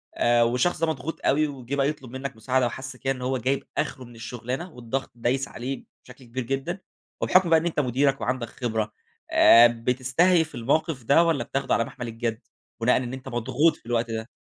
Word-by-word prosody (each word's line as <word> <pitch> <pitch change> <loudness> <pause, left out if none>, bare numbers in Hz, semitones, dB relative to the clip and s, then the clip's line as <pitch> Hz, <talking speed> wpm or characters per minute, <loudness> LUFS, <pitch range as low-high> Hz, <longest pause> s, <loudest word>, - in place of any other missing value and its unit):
آآ، 120 0 +4
والشخص 125 +10 +1
ده 165 - +3
مضغوط 160 0 -3
أوي 155 +2 +3
وجِه 135 -1 -5
بقى 140 0 +2
يطلب 130 -5 -7
منّك 130 0 -5
مساعدة، 125 +3 +1
وحس 130 +2 -4
كده 135 +1 -1
إنه 125 -1 -6
هو 130 +1 0
جايب 130 +3 -1
آخره 130 - -2
من 120 0 -14
الشُغلانة 125 +8 -5
والضغط 125 +2 -4
دايس 125 +3 0
عليه 130 +2 -5 0.2
بشكل 125 +1 -14
كبير 120 +2 -4
جدًا، 135 +9 -3 0.4
وبحكم 185 -1 +4
بقى 165 -1 +6
إن 160 - -5
أنت 165 -3 -1
مديرك 135 0 +1
وعندك 120 +1 -1
خبرة، 110 -4 -3 0.4
آآ، 115 +1 +8
بتستهيف 130 +8 +1
الموقِف 140 +2 0
ده 140 +8 +5
والّا 165 -4 +1
بتاخده 135 0 -1
على 115 - +3
مَحمل 120 +1 -7
الجد، 115 0 -3 0.4
بناءً 125 +2 +4
إن 125 -1 -3
أنت 130 0 -7
مضغوط 130 +6 +2
في - - -30
الوقت 115 -1 0
ده؟ 110 +1 -4
130 Hz, 195 wpm, -25 LUFS, 120-140 Hz, 0.4 s, آآ